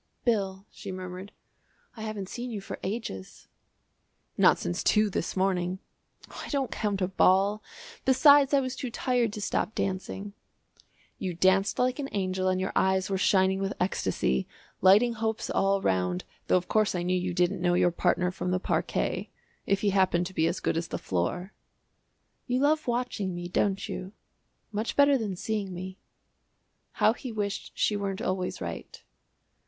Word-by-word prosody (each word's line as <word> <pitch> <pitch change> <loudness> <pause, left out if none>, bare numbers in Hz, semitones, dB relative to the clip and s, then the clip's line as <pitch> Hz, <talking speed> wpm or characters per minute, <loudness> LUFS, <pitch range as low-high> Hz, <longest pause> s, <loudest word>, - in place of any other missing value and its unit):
"Bill," 195 -4 0
she 200 - -8
murmured, 185 +1 -7 0.6
"I 220 - -9
haven't 215 -3 -4
seen 245 +5 -5
you 220 -3 -4
for 195 - -7
ages." 190 - -5 0.9
"Not - - +5
since 85 - -3
two 210 -1 +3
this 180 - -3
morning." 185 -1 +1 0.5
"I - - -8
don't 275 -4 -1
count 200 -3 -1
a - - +2
ball; 195 +3 +3 0.4
besides 280 +1 +6
I 280 -1 +4
was 255 -1 -3
too 255 - -4
tired 245 -1 0
to 210 - -5
stop 215 - -1
dancing." 195 +1 -3 0.9
"You 185 -3 -3
danced 190 +3 +3
like 255 +2 +1
an 275 -1 -3
angel 185 -1 -1
and 185 0 +1
your 190 - -1
eyes 190 0 +2
were 195 - +1
shining 190 0 +3
with 195 0 -1
ecstasy, 65 - 0 0.3
lighting 210 +6 +6
hopes 220 -1 -2
all 195 0 +2
round, 90 -1 0 0.2
though - - +4
of 180 - -3
course 215 -3 +2
I 175 - -1
knew 180 +1 0
you 180 -1 -2
didn't 180 +1 +1
know 175 0 +2
your 175 0 +3
partner 180 +1 +1
from 180 0 -4
the 180 0 +1
parquet - - -1 0.4
if 195 0 +2
he 205 - +2
happened 185 -2 +2
to 190 - -7
be 160 -2 +2
as 170 +2 -1
good - - 0
as 165 - -2
the - - -4
floor." 100 - -2 0.9
"You 250 0 +1
love 305 +1 +2
watching 235 -6 -1
me, 175 0 -5
don't 195 +2 0
you? 190 +2 -6 0.6
much 215 +2 -2
better 285 0 +6
than 215 -7 -2
seeing 205 0 -3
me." 185 +2 -7 0.9
How 215 - +3
he 250 +1 -7
wished 205 -2 -3
she 210 - +2
weren't 195 -1 -2
always 185 -1 -2
right. 85 -2 -6
195 Hz, 170 wpm, -28 LUFS, 185-220 Hz, 0.9 s, besides